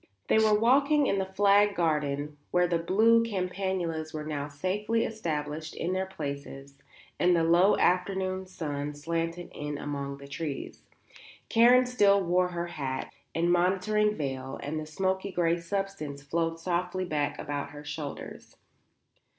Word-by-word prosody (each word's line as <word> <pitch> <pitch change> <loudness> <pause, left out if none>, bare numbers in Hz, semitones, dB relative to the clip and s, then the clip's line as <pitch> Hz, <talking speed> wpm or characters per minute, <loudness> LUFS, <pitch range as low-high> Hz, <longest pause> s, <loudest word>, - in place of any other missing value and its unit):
They - - +5
were 215 -1 +4
walking 280 +5 +4
in 195 - +1
the 190 - -1
flagged 205 +1 +4
garden 150 -3 -1
where 180 0 +3
the 170 -1 +1
blue 220 +7 +4
campanulas 180 -6 -2
were 155 - -3
now 145 -2 -3
safely 200 +10 -1
established 155 -7 -4
in 175 +2 -2
their 190 0 -1
places 140 -5 -6 0.5
and 175 0 +4
the 165 - +2
low 175 +5 +5
afternoon 185 +1 +1
sun 150 -5 -4
slanted 165 +3 -3
in 150 0 -4
among 140 -1 -4
the 140 0 -11
trees. 145 0 -5 0.7
Karen 245 +2 +6
still 205 -5 +4
wore 180 0 +2
her 175 -1 -3
hat 135 -6 -4 0.2
and 170 +2 +2
motoring 195 +4 +2
veil 135 -3 -4
and 155 +2 -3
the 155 - -6
smoky 190 +4 -1
grey 170 -1 +1
substance 170 -6 -4
flowed 165 +3 -1
softly 180 +2 -1
back 150 -3 -1
about 145 -1 -4
her 145 0 -10
shoulders. 150 0 -7
175 Hz, 145 wpm, -29 LUFS, 150-195 Hz, 0.7 s, Karen